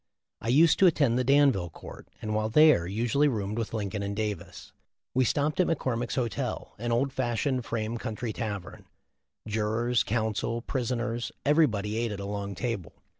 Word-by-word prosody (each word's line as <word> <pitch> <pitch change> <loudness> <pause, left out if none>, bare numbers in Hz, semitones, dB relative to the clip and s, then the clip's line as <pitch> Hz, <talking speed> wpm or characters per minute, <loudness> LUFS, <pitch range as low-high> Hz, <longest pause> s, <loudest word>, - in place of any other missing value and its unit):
I - - -6
used 160 +7 +5
to 190 - +7
attend 140 -7 +3
the - - +2
Danville 135 -9 +3
court, - - -11 0.2
and 110 0 -2
while 110 0 0
there, 150 - +5
usually 120 +9 +1
roomed 105 -4 -2
with 115 - -3
Lincoln 100 -2 -3
and 100 0 -3
Davis. 105 -1 -5 0.4
We 130 - +3
stopped 145 +7 0
at 185 - +4
McCor 135 -7 0
mick's 120 +1 -3
hotel, 120 -4 -3
an 120 +1 -2
old 130 +3 +1
fashioned 125 0 -1
frame 115 0 -3
country 110 +1 -4
tavern. 100 -5 -5 0.6
Jurors, 110 +3 +1
counsel, 110 +1 -1
prisoners, 120 -2 -2
everybody 110 -9 +2
ate 115 -1 -1
at 100 - -5
a 100 - -5
long 100 -1 -4
table. 115 - -3
115 Hz, 170 wpm, -28 LUFS, 105-130 Hz, 0.6 s, to